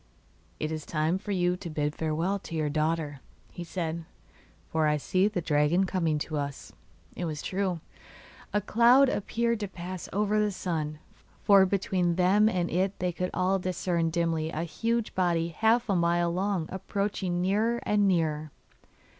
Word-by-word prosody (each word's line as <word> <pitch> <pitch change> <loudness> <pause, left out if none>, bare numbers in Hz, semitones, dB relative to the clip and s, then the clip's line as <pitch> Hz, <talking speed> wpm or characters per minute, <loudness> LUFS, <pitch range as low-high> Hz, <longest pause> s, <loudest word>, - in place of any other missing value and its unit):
'It 155 - -2
is 155 -1 -4
time 160 +4 0
for 210 - -11
you 180 -2 +1
to 180 -1 -7
bid 150 -1 -1
farewell 165 +6 -1
to 165 - -8
your 155 -2 0
daughter,' 155 -2 -1 0.4
said 165 -2 -3
he; 170 - -8 0.6
'for 160 -1 +1
I 150 0 +2
see 185 +6 +1
the 205 -4 -2
dragon 155 +4 +2
coming 170 -5 0
to 155 - -4
us.' 140 -1 -5 0.4
It 180 - -3
was 155 -3 -4
true; 185 -3 -1 0.7
a 210 - +1
cloud 240 +6 +5
appeared 235 +1 -1
to 205 - -3
pass 185 -1 -7
over 210 +2 +1
the 210 0 +2
sun, 160 -5 -3 0.5
for 195 -2 +6
between 185 -2 0
them 195 +4 +4
and 180 -4 0
it 190 +3 0
they 180 0 -1
could 180 +1 -3
all 185 +1 +1
discern 175 -2 -1
dimly 165 -1 0
a 160 0 -3
huge 225 +7 -1
body 170 -2 +1
half 225 +8 +2
a 200 - +1
mile 170 0 +2
long 185 -3 -1
approaching 190 -1 -2
nearer 215 +6 +1
and 205 -1 +3
nearer. 155 -4 0
180 Hz, 165 wpm, -28 LUFS, 160-200 Hz, 0.7 s, for